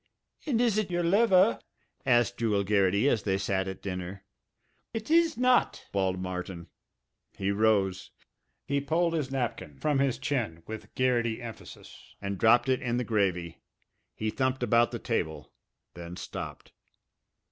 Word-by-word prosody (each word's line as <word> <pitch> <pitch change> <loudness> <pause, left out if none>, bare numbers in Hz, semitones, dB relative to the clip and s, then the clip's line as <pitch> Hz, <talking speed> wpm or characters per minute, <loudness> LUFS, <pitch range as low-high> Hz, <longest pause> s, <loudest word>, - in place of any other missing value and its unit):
"And 245 -6 +1
is 230 -4 +3
it 215 - -2
your 175 -1 0
liver?" 195 +2 +4 0.5
asked 120 -1 +3
Jewel 105 -4 +1
Garrity 100 +3 +2
as 115 -6 +2
they 95 -2 0
sat 95 0 -1
at 95 0 -7
dinner. 95 0 -5 0.7
"It 225 +6 -4
is 330 -1 +4
not!" 250 0 +2
bawled 95 -2 0
Martin. 90 -2 -5 0.7
He 95 0 0
rose. 100 -3 +1 0.6
He 140 0 0
pulled 165 +4 +1
his 150 -5 -1
napkin 120 - -3
from 150 -3 +1
his 135 -3 +1
chin 120 - -2
with 110 0 -9
Garrity 120 -3 +1
emphasis 115 -3 -11
and 100 -1 -4
dropped 120 +2 +5
it 130 -1 +1
in 120 -1 -1
the 125 - 0
gravy. 95 -7 -1 0.6
He 110 0 -2
thumped 130 0 -1
about 120 0 +4
the - - -4
table, 80 0 -3 0.4
then 85 0 -8
stopped. - - -7
115 Hz, 145 wpm, -29 LUFS, 95-140 Hz, 0.7 s, dropped